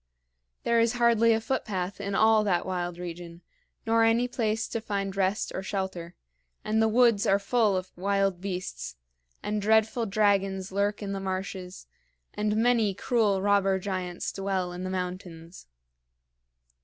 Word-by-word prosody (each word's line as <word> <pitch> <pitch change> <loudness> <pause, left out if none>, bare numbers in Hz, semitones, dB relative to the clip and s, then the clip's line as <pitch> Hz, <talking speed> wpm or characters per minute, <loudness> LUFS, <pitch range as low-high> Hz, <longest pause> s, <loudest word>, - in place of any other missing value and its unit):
There 235 0 +2
is 230 0 +3
hardly 235 -1 +4
a 220 - +3
footpath 200 -6 -3
in 200 0 -3
all 220 0 +5
that 180 -4 +1
wild 175 -2 -3
region, 175 -1 -8 0.4
nor 225 0 +3
any 230 +2 +3
place 225 -3 -1
to 230 - -3
find 200 -3 -3
rest 195 +2 0
or - - -3
shelter; 190 -3 -4 0.5
and 220 +1 +1
the 220 - +4
woods 230 -1 +3
are 195 - +4
full 205 -1 +1
of 185 0 -5
wild 195 -1 0
beasts, 185 - -5 0.5
and 210 0 -2
dreadful 220 +2 +2
dragons 195 -2 +1
lurk 205 +2 -1
in 200 - -4
the 195 - -3
marshes, 190 -1 -5 0.5
and 210 0 -1
many 225 -4 +2
cruel 205 -4 +1
robber 200 -1 +3
giants 185 -2 -4
dwell 190 -2 -2
in 180 +1 -6
the 185 - -3
mountains." 180 - -6
200 Hz, 150 wpm, -27 LUFS, 185-220 Hz, 0.5 s, all